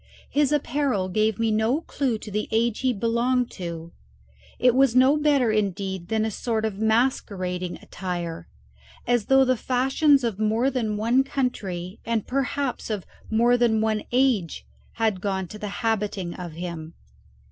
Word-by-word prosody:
His 290 Hz, -1 st, +2 dB
apparel 275 Hz, -9 st, 0 dB
gave 215 Hz, +2 st, +1 dB
me 225 Hz, -1 st, +1 dB
no 220 Hz, +8 st, +1 dB
clue 265 Hz, -8 st, -1 dB
to 210 Hz, -, -9 dB
the 210 Hz, +1 st, -2 dB
age 230 Hz, 0 st, +1 dB
he 260 Hz, -1 st, +2 dB
belonged 240 Hz, +3 st, 0 dB
to; 170 Hz, -2 st, -6 dB, 0.7 s
it 250 Hz, -1 st, +4 dB
was 260 Hz, -1 st, +3 dB
no 260 Hz, +3 st, +6 dB
better, 290 Hz, -6 st, +3 dB
indeed, 195 Hz, -3 st, -2 dB
than 220 Hz, +1 st, 0 dB
a 220 Hz, -, -2 dB
sort 220 Hz, +1 st, -2 dB
of 205 Hz, -2 st, -3 dB
masquerading 200 Hz, -6 st, 0 dB
attire, 175 Hz, -, -5 dB, 0.6 s
as 240 Hz, -3 st, +1 dB
though 270 Hz, 0 st, +5 dB
the 255 Hz, 0 st, +2 dB
fashions 270 Hz, +4 st, +2 dB
of 225 Hz, -4 st, -2 dB
more 220 Hz, +5 st, +2 dB
than 220 Hz, -5 st, -1 dB
one 235 Hz, +5 st, +3 dB
country, 200 Hz, -9 st, -3 dB
and 230 Hz, -2 st, -1 dB
perhaps 275 Hz, 0 st, -2 dB
of 210 Hz, -4 st, -3 dB, 0.2 s
more 235 Hz, +2 st, +3 dB
than 235 Hz, -2 st, +2 dB
one 215 Hz, -1 st, +1 dB
age, 245 Hz, -9 st, +1 dB, 0.3 s
had 220 Hz, -5 st, 0 dB
gone 190 Hz, -2 st, -2 dB
to 215 Hz, -, -9 dB
the 210 Hz, -, -4 dB
habiting 210 Hz, -5 st, -1 dB
of 175 Hz, -3 st, -7 dB
him. 170 Hz, -1 st, -6 dB
220 Hz, 160 wpm, -25 LUFS, 195-255 Hz, 0.7 s, no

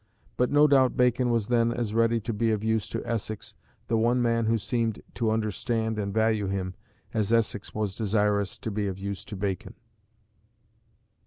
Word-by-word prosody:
But 125 Hz, -, +2 dB
no 145 Hz, +1 st, +5 dB
doubt 135 Hz, -3 st, +4 dB
Bacon 125 Hz, 0 st, +3 dB
was 115 Hz, -3 st, +1 dB
then 115 Hz, -1 st, +2 dB
as 120 Hz, -3 st, -2 dB
ready 115 Hz, 0 st, +3 dB
to 115 Hz, +2 st, -3 dB
be 115 Hz, +2 st, +1 dB
of 110 Hz, -1 st, 0 dB
use 110 Hz, -1 st, 0 dB
to -, -, -4 dB
Essex, 110 Hz, -2 st, -3 dB, 0.3 s
the 115 Hz, -, +1 dB
one 120 Hz, +3 st, +2 dB
man 115 Hz, -1 st, +2 dB
who 115 Hz, +1 st, +3 dB
seemed 115 Hz, -1 st, -1 dB
to 115 Hz, -2 st, 0 dB
understand 110 Hz, +1 st, -1 dB
and 100 Hz, -1 st, -2 dB
value 110 Hz, -1 st, +1 dB
him, 95 Hz, -1 st, -2 dB, 0.4 s
as 110 Hz, -1 st, 0 dB
Essex 115 Hz, -3 st, 0 dB
was 105 Hz, -3 st, -1 dB
desirous 105 Hz, -2 st, 0 dB
to 110 Hz, -, -5 dB
be 105 Hz, 0 st, -1 dB
of 95 Hz, -1 st, -4 dB
use 100 Hz, 0 st, -5 dB
to 105 Hz, -, -7 dB
Bacon. 95 Hz, -1 st, -3 dB
110 Hz, 180 wpm, -27 LUFS, 105-115 Hz, 0.4 s, no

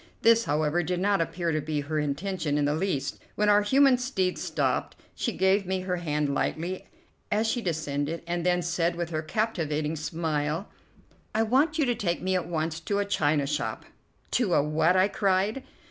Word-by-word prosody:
This, 230 Hz, 0 st, +5 dB
however, 150 Hz, +3 st, +1 dB
did 175 Hz, +1 st, -2 dB
not 200 Hz, -1 st, +2 dB
appear 170 Hz, 0 st, -1 dB
to 155 Hz, -1 st, 0 dB
be 150 Hz, 0 st, -2 dB
her 155 Hz, +2 st, -2 dB
intention 150 Hz, +1 st, -1 dB
in 145 Hz, -, +2 dB
the 145 Hz, -, +1 dB
least; 150 Hz, -5 st, -2 dB, 0.2 s
when 210 Hz, 0 st, +2 dB
our 205 Hz, 0 st, +6 dB
human 265 Hz, +4 st, +4 dB
steeds 190 Hz, -8 st, -1 dB
stopped, -, -, -1 dB, 0.2 s
she 235 Hz, -, -2 dB
gave 190 Hz, -1 st, +2 dB
me 190 Hz, 0 st, -1 dB
her 180 Hz, -1 st, -2 dB
hand 150 Hz, -4 st, -1 dB
lightly 175 Hz, +6 st, -2 dB, 0.4 s
as 215 Hz, +2 st, +2 dB
she 235 Hz, +2 st, 0 dB
descended, 155 Hz, -3 st, -2 dB
and 175 Hz, 0 st, -2 dB
then 180 Hz, 0 st, +2 dB
said, 170 Hz, 0 st, 0 dB
with 170 Hz, -1 st, -3 dB
her 155 Hz, -1 st, -1 dB
captivating 160 Hz, -5 st, -1 dB
smile: 155 Hz, +2 st, -2 dB, 0.7 s
"I 220 Hz, -, +3 dB
want 275 Hz, +8 st, +2 dB
you 305 Hz, -, +3 dB
to 245 Hz, -, +2 dB
take 190 Hz, -7 st, -1 dB
me 185 Hz, +1 st, -1 dB
at 180 Hz, -2 st, 0 dB
once 160 Hz, -1 st, -2 dB
to 200 Hz, +5 st, -2 dB
a 205 Hz, -, +1 dB
china 150 Hz, -7 st, +1 dB
shop." 140 Hz, -6 st, -3 dB, 0.5 s
"To 215 Hz, -8 st, +2 dB
a 145 Hz, -, +4 dB
what?" 160 Hz, +4 st, +2 dB
I 185 Hz, +1 st, +5 dB
cried. 200 Hz, +4 st, +1 dB
175 Hz, 190 wpm, -27 LUFS, 155-200 Hz, 0.7 s, our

